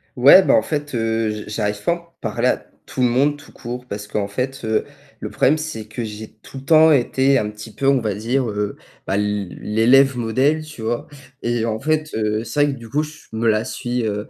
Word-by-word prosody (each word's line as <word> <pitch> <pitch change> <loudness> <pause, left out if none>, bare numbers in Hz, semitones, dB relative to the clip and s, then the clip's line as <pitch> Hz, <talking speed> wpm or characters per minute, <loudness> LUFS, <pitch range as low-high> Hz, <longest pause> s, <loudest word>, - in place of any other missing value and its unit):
Ouais, 135 +9 +8
bah - - +3
en - - +5
fait, 145 +4 -4
heu, 115 -1 0
j 105 0 -4
j'arrive 105 -1 -2
pas - - +2
à - - +2
en 170 -1 -16
parler - - -1
à - - +2 0.3
tout - - -4
le 125 - +5
monde, 140 +4 +2
tout 145 0 -15
court, 125 +1 -7
parce 105 -3 -6
qu'en 105 -1 -2
fait, 130 +5 -3
heu, 110 -1 0 0.3
le - - -5
problème, 150 +4 +2
c'est 130 -9 -5
que 115 +1 -4
j'ai 105 0 -8
tout 135 - -10
le - - -13
temps 160 +1 +6
été 135 +1 +3
un 105 - -1
petit 105 0 -10
peu, 140 - -3
on 135 -2 +4
va 105 -4 -2
dire, 120 +3 -1
heu, 105 0 -3 0.3
bah 95 - 0
l 105 -2 -1
l'élève 125 +5 +4
modèle, 130 +7 +1
tu 150 -6 -11
vois? 120 +7 -2 0.3
Et 120 -1 0
en 110 -1 -2
fait, 155 0 0
heu, 110 0 -1
c'est 145 +3 +1
vrai 145 -1 +1
que 135 - -8
du 115 - -10
coup, 150 +6 0
je 155 +1 -11
me 110 +1 -2
la 110 +1 +1
suis, 120 -2 -3
heu 105 0 -3
120 Hz, 240 wpm, -20 LUFS, 110-140 Hz, 0.3 s, Ouais